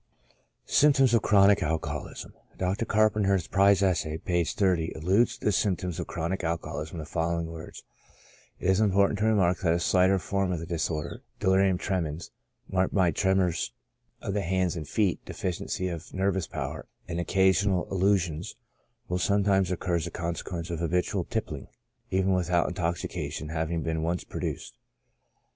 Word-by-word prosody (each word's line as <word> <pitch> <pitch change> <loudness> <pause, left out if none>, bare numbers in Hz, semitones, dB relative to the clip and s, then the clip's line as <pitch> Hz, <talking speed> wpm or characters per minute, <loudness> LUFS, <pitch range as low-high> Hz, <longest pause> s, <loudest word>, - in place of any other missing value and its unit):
SYMPTOMS 135 -4 +4
OF 115 - +4
CHRONIC 100 -1 +5
ALCOHOLISM. 75 -2 -3 0.2
Dr. 95 +5 -1
Carpenter 105 -2 +3
in - - +5
his 90 -4 -1
Prize 100 0 +4
Essay, 80 -5 +1
(p. 85 +1 0
30,) 85 -2 0
alludes 95 +9 +2
to - - -11
the 105 - +4
symptoms 90 -2 0
of - - -4
chronic 85 +3 -3
alcoholism 80 -1 -3
in - - -5
the - - -7
following 85 +1 -1
words: 80 -1 -9 0.4
" - - -28
It 95 - +2
is 95 - +2
important 100 -1 +3
to 105 - +1
remark 95 -5 +3
that 85 -3 +2
a - - 0
slighter 95 +2 +3
form 95 0 -1
of 90 - -1
this 85 +2 -7
dis 85 -3 -1
order, 75 -3 -4 0.2
(delirium 95 0 +3
tremens,) 85 -5 -3 0.4
marked 95 +1 0
by 90 -4 +4
tremors 95 0 +1 0.5
of 100 - -2
the 105 - 0
hands 95 -1 0
and 80 -3 -5
feet, 100 -1 0
deficiency 95 +1 -3
of 85 -1 -6
nervous 95 -3 0
power, - - -5 0.2
and 85 -1 -3
occasional 95 +1 +2
illu 100 +1 +3
sions, 85 -2 -5 0.5
will 90 +1 -1
sometimes 100 -1 +2
occur 90 -1 -1
as 80 - -3
a - - -4
consequence 85 +1 -4
of 85 - -3
habitual 90 +2 0
tippling, 90 - -4 0.4
even 95 0 +2
without 90 -1 +2
intoxication 85 -3 -3
having 80 0 -2
been 80 -1 -1
once 85 +2 -1
pro - - -7
duced. - - -5
90 Hz, 170 wpm, -27 LUFS, 85-95 Hz, 0.5 s, CHRONIC